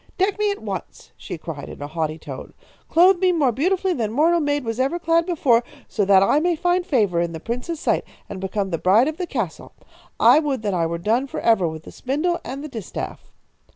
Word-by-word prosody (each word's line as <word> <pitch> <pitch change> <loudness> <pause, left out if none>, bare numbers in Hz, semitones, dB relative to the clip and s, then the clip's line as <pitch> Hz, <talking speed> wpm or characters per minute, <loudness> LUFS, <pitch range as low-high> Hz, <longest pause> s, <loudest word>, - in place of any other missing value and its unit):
"'Deck 395 +2 +1
me 420 0 +2
at 405 0 -4
once!' - - -7
she - - -7
cried, 155 -3 -7
in - - -10
a 145 - -5
haughty 155 0 -3
tone. 140 -4 -9 0.3
'Clothe 355 +2 +5
me 370 -1 +3
more 295 -7 +2
beautifully 365 - +1
than 225 -8 -2
mortal 325 +7 +3
maid 290 -2 0
was 225 +1 -3
ever 275 +6 +1
clad 335 0 +1
before, 260 -9 +3 0.2
so 210 - -1
that 195 -1 +5
I 280 - +3
may 345 +2 +1
find 355 +2 +1
favour 205 - +1
in 170 -1 -2
the 160 - -6
prince's 250 - -4
sight - - +1 0.2
and 195 -2 -7
become 195 0 -2
the 165 - -1
bride 210 +8 +4
of 310 0 -3
the 360 - -3
castle. 225 - -4 0.5
I - - +7
would 280 -7 -2
that 205 -2 -1
I 170 -2 +1
were 170 +1 -3
done 225 +9 0
for - - -5
ever 220 -7 +3
with 160 -1 -6
the - - -11
spindle 305 +7 -1
and 275 +3 -6
the - - -5
distaff.' 225 -9 -7
255 Hz, 225 wpm, -22 LUFS, -, 0.5 s, I